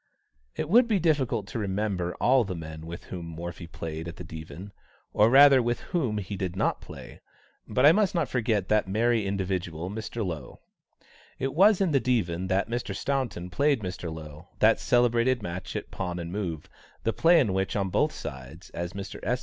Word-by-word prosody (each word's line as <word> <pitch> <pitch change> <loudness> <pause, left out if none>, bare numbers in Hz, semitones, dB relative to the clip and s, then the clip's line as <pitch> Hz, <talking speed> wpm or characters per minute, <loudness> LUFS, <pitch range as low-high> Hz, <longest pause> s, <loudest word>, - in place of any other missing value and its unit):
It 155 - -2
would 235 +8 +5
be 220 -3 +2
difficult 135 - +1
to - - -4
remember 95 -3 -2
all 130 0 +4
the 95 -4 -4
men 80 -1 -8
with 85 +1 -7
whom 90 -2 -7
Morphy 85 +1 -7
played 80 -1 -6
at 85 - -7
the - - -8
Divan; 80 +4 -9 0.4
or, 105 +2 +5
rather, 135 0 +8
with 120 0 -1
whom 130 -12 0
he 100 0 -4
did 90 -2 -3
not - - 0
play. - - -11 0.5
But 130 - +2
I 150 - +10
must 200 0 +2
not 165 -5 +1
forget 110 -6 0
that 105 -2 +2
merry 110 +1 +1
individual, 90 -3 -3
Mr. 110 +1 -4
Lowe. 80 -8 -6 0.8
It 135 0 -2
was 200 +4 +5
in 185 -4 +2
the 140 - +4
Divan 95 -9 0
that 95 +1 +1
Mr. 115 -4 -3
Staunton 120 -8 -2
played 140 +4 +2
Mr. 90 -3 -5
Lowe 80 +1 -9
that 110 +1 +4
celebrated 120 0 +2
match 90 -1 -5
at - - -5
pawn 90 -2 -4
and 85 -1 -5
move, 90 -6 -4 0.4
the 115 - 0
play 165 - +5
in 110 -10 +2
which 95 0 -1
on 100 -2 0
both - - +2
sides, 65 +6 -9
as 85 +1 -5
Mr. 100 0 -7
S. 125 +5 0
100 Hz, 190 wpm, -27 LUFS, 85-125 Hz, 0.8 s, I